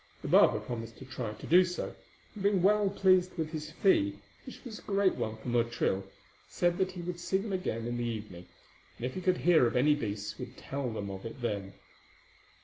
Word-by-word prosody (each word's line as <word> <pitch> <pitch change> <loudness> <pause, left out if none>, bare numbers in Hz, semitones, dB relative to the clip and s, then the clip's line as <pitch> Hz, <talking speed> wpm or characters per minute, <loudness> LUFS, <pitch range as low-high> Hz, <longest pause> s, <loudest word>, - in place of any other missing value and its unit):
The - - -4
barber - - +6
promised 115 -1 -6
to 130 - -10
try 125 -4 -5
to - - -10
do 180 +3 +7
so, 180 0 -4 0.4
and 210 - -8
being 200 -2 +2
well 205 0 +4
pleased 185 -2 +3
with 160 -1 -2
his 155 -1 -5
fee, 100 - +2 0.3
which 260 - -10
was 225 -3 -7
a - - -15
great 195 -2 +2
one 110 0 -3
for 110 - -11
Motril, 115 -5 +1 0.5
said 175 +1 +1
that 185 -1 +1
he 175 -2 -6
would 175 0 -4
see 175 +2 0
them 200 +1 -4
again 115 -11 -2
in 120 0 -2
the 120 - -2
evening, 105 -6 -5 0.5
and 120 - -4
if 130 - -3
he 185 - -4
could 185 0 +2
hear 165 -8 +5
of - - -3
any 145 +4 +5
beasts 105 -5 -4
would 125 0 -8
tell 135 -2 -4
them 100 -3 -4
of 95 0 -7
it 115 +3 -7
then. 100 -5 -3
135 Hz, 220 wpm, -31 LUFS, 115-185 Hz, 0.5 s, do